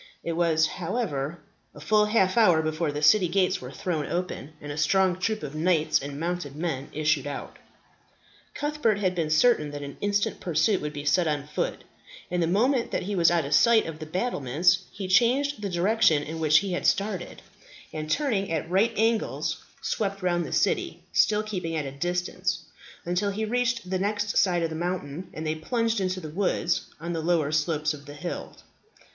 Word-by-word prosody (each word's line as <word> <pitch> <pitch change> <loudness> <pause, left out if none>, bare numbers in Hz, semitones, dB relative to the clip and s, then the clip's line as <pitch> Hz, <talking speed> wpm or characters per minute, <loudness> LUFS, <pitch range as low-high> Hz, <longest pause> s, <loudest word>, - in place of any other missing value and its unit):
It 170 - -2
was, 165 -2 +3
however, 165 - -3 0.3
a - - -10
full 210 +7 +3
half 200 -3 +2
hour 180 -9 +5
before 155 0 -1
the 145 +1 -4
city 180 +5 +6
gates 185 +2 +1
were 125 - -7
thrown 155 +1 -3
open, 170 -4 -4
and 145 - -7
a - - -5
strong 185 +3 +2
troop 215 -1 -1
of 145 -1 -5
knights 160 -1 +2
and 140 +1 -6
mounted 170 -4 -3
men 150 -4 -3
issued 150 -2 0
out. 145 - -6 1.0
Cuthbert 290 -8 0
had 185 -3 0
been 165 -4 -1
certain 155 -1 +3
that 145 0 -6
an 140 0 -8
instant 205 0 0
pursuit 175 +4 +1
would 150 - -3
be 145 0 -7
set 155 +4 +3
on 145 -2 -1
foot, 150 - -3 0.5
and 180 0 0
the 165 - +2
moment 235 +7 +2
that - - -2
he 200 +2 -3
was 170 -3 +5
out 170 -3 +1
of 140 - -2
sight 230 +8 +5
of 160 -1 -6
the 155 - -7
battlements, 175 - +1
he 195 -2 -6
changed 245 +7 +3
the 200 - -2
direction 175 -4 +3
in 160 +2 -6
which 155 -1 +5
he 190 +4 0
had 180 - 0
started, 195 -3 -1 0.5
and 155 0 -5
turning 210 - 0
at 160 -1 -1
right 200 +5 +3
angles, 225 0 0 0.2
swept 195 -2 -2
round 175 -1 +1
the - - -8
city, - - 0
still 210 0 +3
keeping 180 -6 -4
at 150 -2 -1
a 135 - -5
distance, 180 +5 -2 0.4
until 180 +4 0
he 215 +2 -2
reached 240 0 0
the 185 0 -1
side - - -3
next 205 +1 +1 0.3
the - - -6
mountains, 175 -1 -3
and 155 - -5
then 155 0 -2
plunged 230 +1 0
into 185 0 -1
the 155 -4 -7
woods 180 -1 0
on 170 +2 -4
the 165 - -2
lower 160 -3 +1
slopes 155 0 0
of 145 -1 -11
the 145 - -9
hills. 175 +4 -6
175 Hz, 195 wpm, -26 LUFS, 155-200 Hz, 1.0 s, city